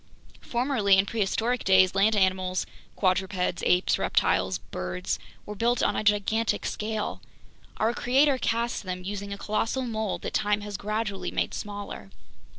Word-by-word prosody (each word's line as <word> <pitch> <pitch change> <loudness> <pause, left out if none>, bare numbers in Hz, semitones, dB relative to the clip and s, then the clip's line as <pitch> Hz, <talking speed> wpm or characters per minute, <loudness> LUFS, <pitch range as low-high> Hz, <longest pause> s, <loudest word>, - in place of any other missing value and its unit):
Formerly, 235 -6 +2
in 190 - +4
prehistoric 225 +3 0
days, 190 -1 +5
land 205 +3 +3
animals 185 -1 +1 0.3
(quadrupeds, 185 -2 0
apes, 180 0 +3
reptiles, 95 -1 +1
birds) 95 - -4 0.3
were 210 - -6
built 235 +4 +1
on - - +2
a - - -1
gigantic 210 +2 +1
scale. 215 0 -3 0.6
Our 225 +2 +1
Creator 265 +3 +3
cast 235 0 0
them 185 -2 -5
using 200 +1 -5
a 200 - -4
colossal 225 +6 -1
mold 220 -4 -3
that - - -4
time 210 0 +1
has 205 -1 -6
gradually 210 0 -2
made - - -1
smaller. 205 - -6
205 Hz, 145 wpm, -27 LUFS, 190-225 Hz, 0.6 s, days